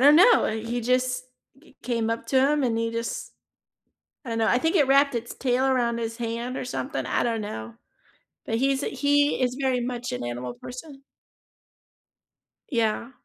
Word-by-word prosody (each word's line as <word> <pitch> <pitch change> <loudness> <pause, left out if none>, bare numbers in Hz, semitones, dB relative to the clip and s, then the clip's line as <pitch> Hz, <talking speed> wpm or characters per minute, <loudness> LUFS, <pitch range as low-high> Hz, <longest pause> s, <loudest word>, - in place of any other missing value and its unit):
don't 290 +3 +7
know, 440 +7 +7
uh, - - 0
he 230 +2 -3
just 255 +1 0 0.4
g 320 - -22
came 230 -2 -1
up 230 0 -3
to 265 - +2
him 300 -1 +1
and 235 -3 +1
he 230 0 -1
just 230 - -4 0.9
I - - -6
don't 230 0 -2
know, 220 - +2
I 245 - +4
think 320 +7 +1
it 290 -7 +4
wrapped 280 0 +4
its 235 0 -4
tail 255 0 +1
around 245 -3 +1
his 230 0 -4
hand 235 +2 -3
or - - -4
something, 260 +3 -3
I - - 0
don't 230 -2 -1
know. 110 - -6 0.7
But 225 - -1
he's 270 +2 +1
he 285 +1 +2
is 250 -1 +1
very 260 -2 +1
much 245 0 -4
an 125 0 -4
animal 120 +1 -4
person. 270 +2 -9 1.7
Yeah. 230 -1 0
245 Hz, 180 wpm, -25 LUFS, 230-270 Hz, 1.7 s, don't